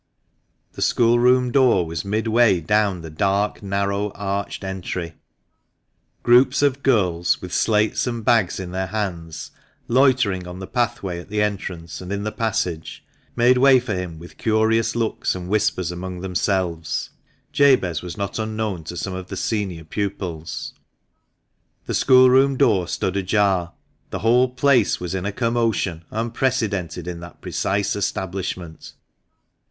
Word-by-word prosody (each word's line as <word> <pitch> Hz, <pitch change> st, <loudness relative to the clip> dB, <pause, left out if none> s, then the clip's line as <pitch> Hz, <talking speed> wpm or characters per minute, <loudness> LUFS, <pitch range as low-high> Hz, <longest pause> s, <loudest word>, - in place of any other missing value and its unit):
The -, -, -8 dB
schoolroom 125 Hz, +2 st, +3 dB
door 120 Hz, -9 st, +4 dB
was 80 Hz, 0 st, -4 dB
midway 110 Hz, 0 st, +2 dB
down 100 Hz, +1 st, +1 dB
the 80 Hz, -1 st, -9 dB
dark, 100 Hz, +5 st, 0 dB
narrow, 100 Hz, +1 st, -1 dB
arched 100 Hz, 0 st, -3 dB
entry. 90 Hz, -3 st, -4 dB, 1.1 s
Groups 125 Hz, +4 st, +5 dB
of 140 Hz, -1 st, +2 dB
girls, 90 Hz, -10 st, +2 dB
with 90 Hz, -1 st, -8 dB
slates 110 Hz, +2 st, +1 dB
and 120 Hz, -3 st, -4 dB
bags 110 Hz, -7 st, +2 dB
in 90 Hz, -2 st, -6 dB
their 95 Hz, +1 st, -2 dB
hands, 85 Hz, -7 st, -4 dB, 0.4 s
loitering 120 Hz, -8 st, +2 dB
on 90 Hz, 0 st, -8 dB
the 95 Hz, -, -6 dB
pathway 100 Hz, -6 st, -2 dB
at 85 Hz, -, -12 dB
the 105 Hz, 0 st, +1 dB
entrance 90 Hz, -5 st, -4 dB
and 90 Hz, +1 st, -7 dB
in 100 Hz, 0 st, -2 dB
the 105 Hz, -, -2 dB
passage, 110 Hz, -9 st, -3 dB, 0.3 s
made 125 Hz, +1 st, +4 dB
way 135 Hz, 0 st, +6 dB
for 120 Hz, -3 st, -4 dB
him, 90 Hz, -3 st, -4 dB
with 85 Hz, +2 st, -13 dB
curious 110 Hz, +1 st, +2 dB
looks 115 Hz, -4 st, -1 dB
and 90 Hz, -1 st, -6 dB
whispers 105 Hz, -4 st, 0 dB
among 90 Hz, 0 st, -6 dB
themselves 90 Hz, -4 st, -1 dB, 0.4 s
(Jabez 130 Hz, -, +3 dB
was 90 Hz, +2 st, -7 dB
not 100 Hz, +2 st, -3 dB
unknown 110 Hz, -5 st, -3 dB
to 90 Hz, -, -6 dB
some 95 Hz, -, -3 dB
of 95 Hz, 0 st, -6 dB
the 95 Hz, -, -6 dB
senior 95 Hz, -5 st, -2 dB
pupils). 85 Hz, -2 st, -4 dB, 1.1 s
The -, -, -3 dB
schoolroom 130 Hz, +1 st, +5 dB
door 95 Hz, -8 st, +3 dB
stood 95 Hz, -, -2 dB
ajar; 95 Hz, -3 st, +1 dB, 0.4 s
the 95 Hz, -, -4 dB
whole 125 Hz, +3 st, +4 dB
place 125 Hz, -3 st, +2 dB
was 90 Hz, 0 st, -4 dB
in 95 Hz, 0 st, -2 dB
a -, -, -1 dB
commotion 115 Hz, -7 st, -1 dB
unprecedented 110 Hz, -, -2 dB
in 90 Hz, -1 st, -5 dB
that 85 Hz, 0 st, -11 dB
precise 100 Hz, +1 st, -1 dB
establishment. 95 Hz, -4 st, -4 dB
100 Hz, 140 wpm, -22 LUFS, 90-115 Hz, 1.1 s, way